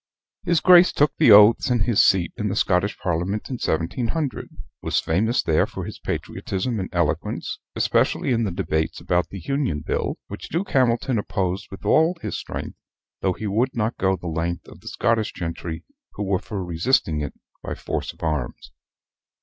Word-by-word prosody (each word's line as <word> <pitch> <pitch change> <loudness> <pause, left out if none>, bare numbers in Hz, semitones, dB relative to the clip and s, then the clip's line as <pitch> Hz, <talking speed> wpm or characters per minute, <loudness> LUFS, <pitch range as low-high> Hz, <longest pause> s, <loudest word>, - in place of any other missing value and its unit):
His 170 -2 +2
Grace 180 0 +7
took 145 -1 +2
the - - +5
oaths 105 +6 +7
and 120 -4 +2
his 115 -1 +4
seat 90 -4 +3
in 105 -3 -2
the 95 - -2
Scottish 100 0 +1
parliament 90 +4 -2
in 125 - -2
1700: 120 - -2 0.3
was - - 0
famous 110 +9 +1
there 80 -1 +2
for - - -6
his - - -8
patriotism 110 +4 -3
and 95 - -4
eloquence, 85 -4 -1 0.2
especially - - +1
in 115 -1 +2
the 105 - 0
debates 80 -2 -2
about 90 0 0
the 100 - -7
Union 130 - -1
Bill, - - -1
which - - -8
Duke 180 +4 -2
Hamilton 125 -2 +2
opposed 95 -2 -2
with 95 - -10
all 165 +3 +3
his - - -4
strength, - - -6 0.4
though 95 - +1
he 110 - -7
would 115 +6 0
not 110 0 -1
go 95 0 +2
the 90 - -12
length 85 +1 -3
of - - -13
the - - -14
Scottish 110 -2 0
gentry, 85 -1 -5 0.3
who 105 - -4
were 95 -2 0
for 100 -2 -5
resisting 85 - +1
it 75 - -5 0.3
by - - -5
force - - -4
of - - -15
arms. 70 -6 -3
100 Hz, 180 wpm, -23 LUFS, 85-120 Hz, 0.4 s, Grace